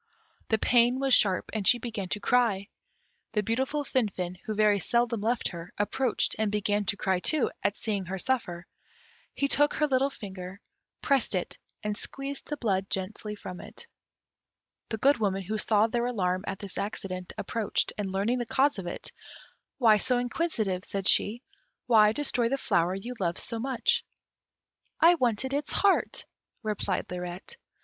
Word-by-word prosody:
The 220 Hz, -, +3 dB
pain 245 Hz, +3 st, +3 dB
was 270 Hz, -1 st, +2 dB
sharp, 190 Hz, -6 st, +4 dB
and 215 Hz, -3 st, -1 dB
she 245 Hz, -, +6 dB
began 220 Hz, -5 st, -5 dB
to 210 Hz, -, -1 dB
cry; 215 Hz, -4 st, +1 dB, 0.6 s
the 210 Hz, -, +1 dB
beautiful 265 Hz, +7 st, -1 dB
Finfin, 190 Hz, -9 st, -2 dB
who 215 Hz, -, -3 dB
very 210 Hz, -1 st, +4 dB
seldom 235 Hz, +1 st, +1 dB
left 230 Hz, +2 st, 0 dB
her, 170 Hz, -1 st, -8 dB
approached, 235 Hz, +4 st, 0 dB
and 215 Hz, -2 st, +1 dB
began 205 Hz, 0 st, 0 dB
to 205 Hz, +1 st, 0 dB
cry 190 Hz, -2 st, +1 dB
too, 300 Hz, -, +3 dB
at 205 Hz, +1 st, 0 dB
seeing 205 Hz, -4 st, -2 dB
her 190 Hz, +2 st, -4 dB
suffer. 180 Hz, -7 st, -1 dB, 0.7 s
He 280 Hz, -, +1 dB
took 290 Hz, +1 st, +4 dB
her 305 Hz, -, +2 dB
little 270 Hz, -1 st, +2 dB
finger, 190 Hz, -5 st, -8 dB, 0.4 s
pressed 270 Hz, -7 st, +2 dB
it, 180 Hz, -, -3 dB, 0.2 s
and 210 Hz, 0 st, -1 dB
squeezed 275 Hz, +5 st, -5 dB
the 295 Hz, -, -4 dB
blood 195 Hz, -6 st, -1 dB
gently 210 Hz, +2 st, -3 dB
from 185 Hz, -3 st, -8 dB
it. -, -, -12 dB, 1.0 s
The 220 Hz, -, -2 dB
Good 275 Hz, +3 st, +3 dB
Woman, 195 Hz, -2 st, 0 dB
who 215 Hz, +4 st, -2 dB
saw 210 Hz, 0 st, +3 dB
their 235 Hz, +1 st, -1 dB
alarm 185 Hz, -5 st, -1 dB
at 195 Hz, -, -3 dB
this 200 Hz, -1 st, -5 dB
accident, 190 Hz, -3 st, -4 dB
approached, 225 Hz, -3 st, -1 dB
and 200 Hz, -2 st, -3 dB
learning 205 Hz, +6 st, 0 dB
the 240 Hz, -, -3 dB
cause 275 Hz, -1 st, +2 dB
of 180 Hz, -, -6 dB
it, -, -, -5 dB, 0.7 s
"Why 225 Hz, -5 st, +5 dB
so 250 Hz, +4 st, +1 dB
inquisitive" 240 Hz, -, -1 dB
said 195 Hz, -2 st, -3 dB
she; 235 Hz, +5 st, +3 dB, 0.4 s
"why 215 Hz, -3 st, +6 dB
destroy 245 Hz, -2 st, 0 dB
the 275 Hz, -, 0 dB
flower 175 Hz, -7 st, +1 dB
you 235 Hz, +6 st, -6 dB
loved 175 Hz, -2 st, -1 dB
so 230 Hz, -, -5 dB
much?" 270 Hz, -, +1 dB, 1.0 s
"I 335 Hz, +2 st, +7 dB
wanted 260 Hz, -3 st, 0 dB
its 285 Hz, 0 st, -1 dB
heart," 400 Hz, -1 st, +2 dB, 0.4 s
replied 210 Hz, -3 st, -2 dB
Lirette. 180 Hz, -, -6 dB
215 Hz, 165 wpm, -28 LUFS, 195-250 Hz, 1.0 s, I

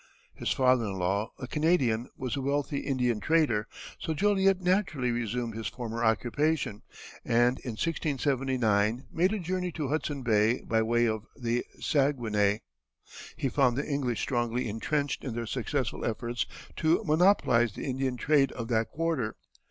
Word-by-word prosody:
His -, -, -3 dB
father 130 Hz, -3 st, +3 dB
in 100 Hz, -, -3 dB
law, 100 Hz, +5 st, 0 dB
a 130 Hz, -, -6 dB
Canadian, 130 Hz, -6 st, +1 dB
was 130 Hz, -1 st, -3 dB
a 140 Hz, -, -2 dB
wealthy 140 Hz, +1 st, -1 dB
Indian 125 Hz, -5 st, 0 dB
trader, 130 Hz, -7 st, +2 dB, 0.3 s
so 160 Hz, -, -2 dB
Joliet 195 Hz, +1 st, +3 dB
naturally 180 Hz, -9 st, +1 dB
resumed 120 Hz, 0 st, -2 dB
his 110 Hz, -1 st, -4 dB
former 115 Hz, +1 st, -4 dB
occupation, 120 Hz, +1 st, +1 dB, 0.4 s
and 120 Hz, +2 st, +2 dB
in 125 Hz, -, -5 dB
1679 130 Hz, -7 st, 0 dB
made 180 Hz, +4 st, +2 dB
a 215 Hz, -, 0 dB
journey 180 Hz, 0 st, -2 dB
to 150 Hz, -5 st, -3 dB
Hudson 145 Hz, -2 st, -2 dB
Bay 110 Hz, 0 st, +3 dB
by 110 Hz, 0 st, +1 dB
way 120 Hz, +1 st, +2 dB
of 110 Hz, 0 st, -2 dB
the 120 Hz, -2 st, -1 dB, 0.2 s
Saguenay. 115 Hz, -8 st, +1 dB, 0.8 s
He -, -, 0 dB
found 125 Hz, -1 st, +2 dB
the 140 Hz, -, -1 dB
English 135 Hz, -5 st, -1 dB
strongly 120 Hz, -1 st, -1 dB
intrenched 140 Hz, +7 st, -2 dB
in 125 Hz, -4 st, -4 dB
their 120 Hz, 0 st, -2 dB
successful 125 Hz, +2 st, -2 dB
efforts 120 Hz, +1 st, -2 dB, 0.3 s
to 165 Hz, +6 st, +2 dB
monopolize 150 Hz, -, +3 dB
the -, -, -6 dB
Indian 130 Hz, -1 st, -1 dB
trade 140 Hz, +1 st, +3 dB
of 115 Hz, -1 st, -5 dB
that 110 Hz, -2 st, +1 dB
quarter. 155 Hz, -9 st, -1 dB
125 Hz, 150 wpm, -29 LUFS, 115-150 Hz, 0.8 s, father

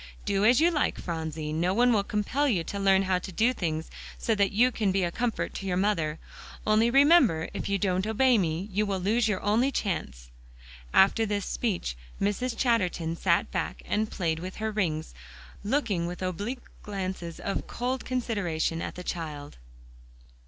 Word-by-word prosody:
Do 195 Hz, 0 st, +1 dB
as 240 Hz, +4 st, +6 dB
you 335 Hz, +2 st, +4 dB
like, 300 Hz, -3 st, 0 dB
Phronsie. 160 Hz, -2 st, -4 dB
No 175 Hz, +4 st, +1 dB
one 245 Hz, +1 st, +4 dB
will 205 Hz, -2 st, +2 dB
compel 215 Hz, +8 st, 0 dB
you 185 Hz, -9 st, +1 dB
to 200 Hz, +5 st, -5 dB
learn 195 Hz, -1 st, +4 dB
how 185 Hz, -1 st, +1 dB
to 190 Hz, -, -8 dB
do 230 Hz, +7 st, +2 dB
things 160 Hz, -7 st, -3 dB, 0.3 s
so 225 Hz, -, 0 dB
that 200 Hz, -2 st, +2 dB
you 245 Hz, +5 st, +4 dB
can 215 Hz, -4 st, 0 dB
be 190 Hz, 0 st, +1 dB
a 175 Hz, -, 0 dB
comfort 240 Hz, +4 st, -2 dB
to 195 Hz, -, -5 dB
your 180 Hz, -1 st, 0 dB
mother. 165 Hz, -6 st, 0 dB, 0.5 s
Only 215 Hz, +2 st, +4 dB
remember, 275 Hz, -, +5 dB
if -, -, -4 dB
you 200 Hz, -, +2 dB
don't 190 Hz, 0 st, 0 dB
obey 240 Hz, +2 st, +4 dB
me, 170 Hz, +1 st, -1 dB
you 210 Hz, +2 st, 0 dB
will 195 Hz, -1 st, -1 dB
lose 220 Hz, +5 st, +1 dB
your 210 Hz, -3 st, 0 dB
only 230 Hz, +6 st, +2 dB
chance." 155 Hz, -, -3 dB, 0.6 s
After 195 Hz, +4 st, +5 dB
this 205 Hz, -2 st, -1 dB
speech, 185 Hz, -, -2 dB, 0.2 s
Mrs. 225 Hz, +4 st, -1 dB
Chatterton 180 Hz, -9 st, +1 dB
sat -, -, +1 dB
back -, -, -3 dB
and 215 Hz, +1 st, 0 dB
played 160 Hz, -3 st, -1 dB
with 185 Hz, +2 st, -6 dB
her 220 Hz, 0 st, -2 dB
rings, 160 Hz, -7 st, -2 dB, 0.5 s
looking 205 Hz, -7 st, 0 dB
with 180 Hz, +1 st, -6 dB
oblique 205 Hz, +8 st, -3 dB, 0.2 s
glances 185 Hz, -4 st, -5 dB
of 195 Hz, -, -3 dB
cold 250 Hz, +2 st, -2 dB
consideration 195 Hz, -10 st, -1 dB
at -, -, -5 dB
the 180 Hz, -, -7 dB
child. 150 Hz, -, -5 dB
200 Hz, 180 wpm, -28 LUFS, 175-225 Hz, 0.6 s, as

